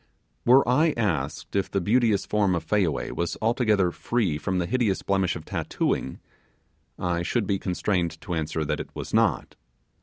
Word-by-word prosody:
Were 130 +2 +6
I 150 +6 +3
asked 80 -11 -2
if 100 - 0
the 100 - 0
beauteous 110 +2 +2
form 100 -3 +1
of 85 - -3
Fayaway 90 -4 0
was 85 -1 -2
altogether 110 -5 +2
free 95 -8 -1
from 95 +5 -1
the 90 - 0
hideous 110 -2 0
blemish 95 -2 +1
of 80 -2 -8
tattooing, 65 - -2 0.8
I 85 -1 -1
should 105 +5 0
be 95 0 0
constrained 90 -3 -1
to 90 - -5
answer 80 -1 -2
that - - -1
it - - -6
was - - -6
not. - - +2
95 Hz, 170 wpm, -25 LUFS, 85-110 Hz, 0.8 s, Were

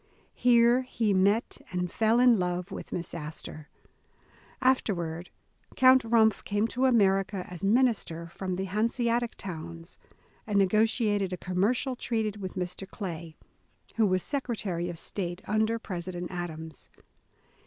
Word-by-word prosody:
Here 240 0 +4
he 230 -5 0
met, 200 +5 +2
and 180 -1 -2
fell 225 +1 +3
in 245 -4 +6
love 180 +1 -2
with - - -7
Miss 175 - -3
As 155 -1 -6
tor. 155 -1 -8 0.9
Afterward 180 -10 0 0.5
Count 260 0 +7
Rumpff 225 -2 +3
came 205 +2 0
to 255 +3 0
America 195 -5 +2
as 180 -1 -9
minister 205 -7 +2
from 185 +2 -4
the 190 - -2
Hanseatic 230 +4 0
towns, 165 -2 -8 0.5
and 205 -2 +1
negotiated 205 -1 +2
a - - -3
commercial 215 +10 0
treaty 220 -4 -2
with 190 -2 -6
Mr. 185 +1 -4
Clay, 170 -6 -6 0.6
who 220 -2 +4
was 185 -1 +1
Secretarj^ 210 - -2
of 170 - -6
State 175 +1 -4
under 220 +2 +1
President 175 -4 -5
Adams. 160 -4 -6
195 Hz, 130 wpm, -28 LUFS, 175-230 Hz, 0.9 s, Count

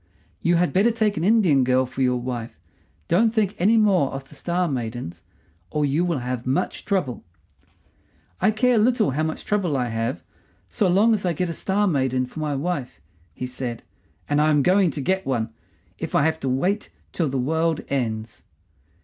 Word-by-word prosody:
"You 170 +1 +2
had 175 +1 +1
better 200 +5 +4
take 220 -3 +1
an 160 - -2
Indian 185 - +4
girl 130 +1 +2
for 130 +1 -6
your 125 -1 +2
wife. 120 -2 -5 0.5
Don't 220 +6 +3
think 215 -3 0
any 215 +6 +4
more 195 -10 +3
of 135 0 -7
the - - -15
Star 175 +5 -1
maidens, 115 - -4 0.5
or 150 -1 0
you 145 +5 +1
will 175 -3 0
have 125 -1 -4
much 135 +8 -1
trouble." 180 - -1 1.2
"I - - +3
care 240 +2 +3
little 225 - +3
how 145 +4 -1
much 160 0 -3
trouble 185 -9 0
I 125 -2 -1
have, 115 +6 -3 0.5
so 210 -5 +1
long 205 +6 +4
as 210 - -1
I 175 -2 +1
get 180 +2 -2
a - - -3
Star 200 +5 0
maiden 130 -7 +1
for 125 - -9
my 150 -2 -1
wife," 140 - -3 0.4
he 125 - -4
said; 125 -2 -5 0.4
"and 145 +1 +2
I 155 - +3
am 145 -2 +3
going 185 +2 +4
to 145 -1 -4
get 190 +7 0
one, 115 -4 -2 0.5
if - - -4
I 145 - +4
have 160 0 0
to 135 - -2
wait 180 +11 0 0.2
till 165 -5 -1
the 135 - -2
world 160 +4 0
ends." 110 -5 -3
155 Hz, 190 wpm, -23 LUFS, 130-190 Hz, 1.2 s, better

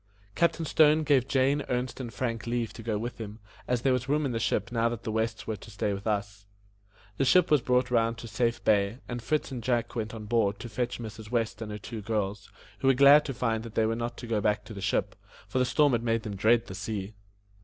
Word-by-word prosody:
Captain 165 +2 +1
Stone 155 0 +4
gave 135 -4 +3
Jane, 135 +2 +2
Ernest, 125 +1 -2
and 120 -3 -5
Frank 115 -2 -3
leave 120 -1 -1
to - - -9
go 110 -2 -1
with 120 +3 -5
him, 105 -1 -7 0.3
as 125 -1 0
there 135 - +3
was 125 +1 -2
room 150 +1 +2
in 135 - -1
the 115 - -1
ship 115 +1 -1
now 115 -1 +2
that 115 -1 -6
the 110 - -3
Wests 110 -1 -2
were 110 -1 -3
to - - -13
stay 105 -1 -2
with 100 +2 -6
us. 100 -1 -2 0.7
The - - +2
ship 180 +7 +4
was 150 -3 +5
brought 125 0 +1
round 115 -1 +2
to 120 - -8
Safe 120 +1 -1
Bay, 100 +1 +2
and 120 0 -4
Fritz 150 +5 -1
and 125 -3 -4
Jack 120 0 -1
went 110 -1 -3
on 110 -1 -7
board 105 -3 +1
to 120 - -7
fetch 125 +2 -2
Mrs. 110 -2 -8
West 115 -3 -1
and 110 -1 -5
her 105 - -4
two 110 +2 -7
girls, 105 -1 -3 0.3
who 135 - 0
were 135 - +5
glad 140 +3 +8
to 135 - -3
find 115 -3 0
that 115 -1 -10
they 110 - +3
were 115 +1 0
not 120 0 -4
to 120 - -7
go 115 -3 0
back 105 0 0
to 110 - -9
the 100 - -7
ship, - - 0 0.3
for 130 - -1
the 125 - +3
storm 145 +3 +3
had 120 -2 +1
made 115 -1 0
them 105 -2 -5
dread 115 +4 +3
the - - -8
sea. 100 +1 -4
115 Hz, 255 wpm, -28 LUFS, 110-125 Hz, 0.7 s, glad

